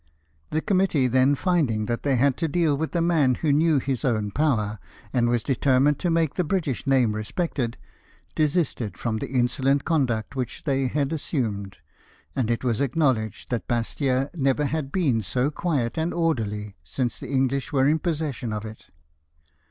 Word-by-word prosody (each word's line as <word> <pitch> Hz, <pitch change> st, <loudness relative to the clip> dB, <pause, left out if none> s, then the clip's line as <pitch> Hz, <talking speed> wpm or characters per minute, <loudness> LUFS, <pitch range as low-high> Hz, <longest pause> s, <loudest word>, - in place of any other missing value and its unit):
The 155 Hz, -, 0 dB
committee 185 Hz, -8 st, +2 dB
then 130 Hz, +3 st, +3 dB
finding 140 Hz, -, +1 dB
that 120 Hz, +1 st, -2 dB
they 140 Hz, -2 st, +1 dB
had 130 Hz, +1 st, +3 dB
to 165 Hz, -, 0 dB
deal 160 Hz, -1 st, +2 dB
with 160 Hz, +4 st, -3 dB
a 170 Hz, -, +2 dB
man 155 Hz, -7 st, +3 dB
who 150 Hz, +1 st, +1 dB
knew 155 Hz, +1 st, +3 dB
his 135 Hz, -1 st, -2 dB
own 110 Hz, -5 st, 0 dB
power, 110 Hz, -7 st, 0 dB, 0.3 s
and 120 Hz, -2 st, +2 dB
was 120 Hz, -2 st, +1 dB
determined 135 Hz, +1 st, +2 dB
to 175 Hz, -, 0 dB
make 165 Hz, -3 st, +1 dB
the 180 Hz, -, 0 dB
British 160 Hz, -7 st, -2 dB
name 130 Hz, -5 st, +3 dB
respected, 120 Hz, -, -2 dB, 0.6 s
desisted 150 Hz, -, 0 dB
from 115 Hz, -2 st, -2 dB
the -, -, -4 dB
insolent 130 Hz, +2 st, +1 dB
conduct 130 Hz, -8 st, 0 dB
which 125 Hz, -3 st, -4 dB
they 135 Hz, -3 st, +1 dB
had 145 Hz, +3 st, -1 dB
assumed, 110 Hz, -, -3 dB, 0.6 s
and 125 Hz, -5 st, 0 dB
it 120 Hz, +1 st, -1 dB
was 120 Hz, -2 st, 0 dB
acknowledged 130 Hz, -7 st, 0 dB
that 120 Hz, -, -2 dB
Bastia 130 Hz, +3 st, 0 dB
never 140 Hz, -2 st, +1 dB
had 145 Hz, -1 st, -2 dB
been 140 Hz, -12 st, +1 dB
so 125 Hz, +7 st, 0 dB
quiet 145 Hz, -5 st, -1 dB
and 165 Hz, +2 st, -1 dB
orderly 105 Hz, -11 st, -1 dB
since 120 Hz, -, -2 dB
the -, -, -8 dB
English 135 Hz, 0 st, 0 dB
were 135 Hz, -1 st, +3 dB
in 155 Hz, +2 st, +3 dB
possession 150 Hz, -9 st, -2 dB
of 105 Hz, 0 st, -4 dB
it. 110 Hz, 0 st, -10 dB
135 Hz, 170 wpm, -25 LUFS, 120-155 Hz, 0.6 s, then